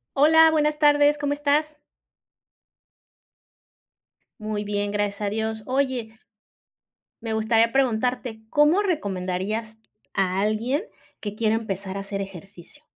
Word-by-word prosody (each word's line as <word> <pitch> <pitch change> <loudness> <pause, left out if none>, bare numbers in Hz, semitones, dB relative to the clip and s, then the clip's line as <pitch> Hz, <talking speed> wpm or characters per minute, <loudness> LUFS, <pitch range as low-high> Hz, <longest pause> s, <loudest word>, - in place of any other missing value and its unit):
Hola, 320 +3 +6
buenas 300 -1 +1
tardes, 290 -1 +4
¿cómo 290 0 -1
estás? 295 +1 0 2.6
Muy 215 -1 -3
bien, 205 0 -2
gracias 205 0 -2
a 200 - 0
Dios. 220 0 -3
Oye 255 -4 -2 1.0
Me 225 -1 -3
gustaría 225 +1 +2
preguntarte, 245 -2 0
¿cómo 300 +7 +4
recomendarías 210 - -3 0.3
a 190 -1 0
alguien 225 - 0 0.4
que 210 -1 -6
quiere 220 0 +1
empezar 195 -3 -4
a - - -3
hacer 195 0 -5
ejercicio? 195 - -10
220 Hz, 110 wpm, -24 LUFS, 205-285 Hz, 2.6 s, Hola